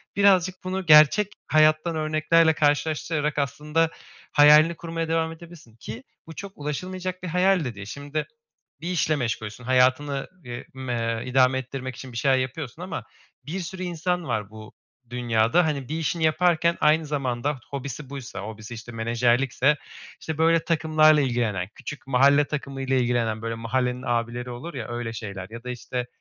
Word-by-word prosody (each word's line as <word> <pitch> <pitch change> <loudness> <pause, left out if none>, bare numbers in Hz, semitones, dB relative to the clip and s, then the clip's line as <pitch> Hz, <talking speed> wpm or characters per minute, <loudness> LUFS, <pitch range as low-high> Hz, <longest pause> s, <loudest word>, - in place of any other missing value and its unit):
birazcık 190 -3 +4
bunu 185 0 -3
gerçek 155 +7 +6
hayattan 155 +2 +3
örneklerle 155 +1 +3
karşılaştırarak, 150 0 0
aslında, 150 +4 0 0.4
hayalini 150 +3 +7
kurmaya 165 0 -4
devam 160 0 0
edebilirsin 165 -8 -13
ki 115 +1 -8 0.2
bu 160 - -10
çok 200 +4 -7
ulaşılmayacak 185 +5 -4
bir - - -3
hayal 180 0 +2
de 120 -3 -4
değil. 100 -1 -8
Şimdi, 145 +6 -4 0.5
bir 170 - -5
işle 155 -3 +1
meşgulsün, 115 -3 -4
hayatını, 130 +2 +2 0.2
eee, 120 0 -7
m 130 -1 -4
eee, 115 +1 -2
idame 130 0 +4
ettirmek 130 0 -5
için 130 0 -9
bir 115 - -7
şeyler 135 +2 +3
yapıyorsun 130 0 -4
ama - - -5 0.4
bir 165 +7 -4
sürü 185 +1 -6
insan 180 0 -1
var 110 -5 -2
bu 110 0 -12 0.4
dünyada. 120 +6 +2
Hani, 140 -4 -2
bir 155 - -2
işini 165 +1 -1
yaparken 170 +1 +3
aynı 155 +1 +4
zamanda 140 -1 -2
hobisi 140 0 -6
buysa 135 -7 -7
hobisi, 110 +3 -8
işte, 115 +1 -9
menajerlikse, 120 +5 +2 0.4
işte, 160 -2 -5
böyle, 165 +1 +3
takımlarla 155 -2 +4
ilgilenen, 120 -8 -1
küçük 150 -2 -8
mahalle 140 +3 +5
takımıyla 135 -2 -3
ilgilenen, 120 -3 0
böyle, 115 0 -3
mahallenin 125 +2 -1
abileri 120 +1 -1
olur 125 +8 -7
ya, 125 -5 -5
öyle 120 -1 -4
şeyler 100 -4 -6
ya 115 +1 -9
da, 125 - -6
işte, 125 0 -4
140 Hz, 160 wpm, -25 LUFS, 120-160 Hz, 0.5 s, hayalini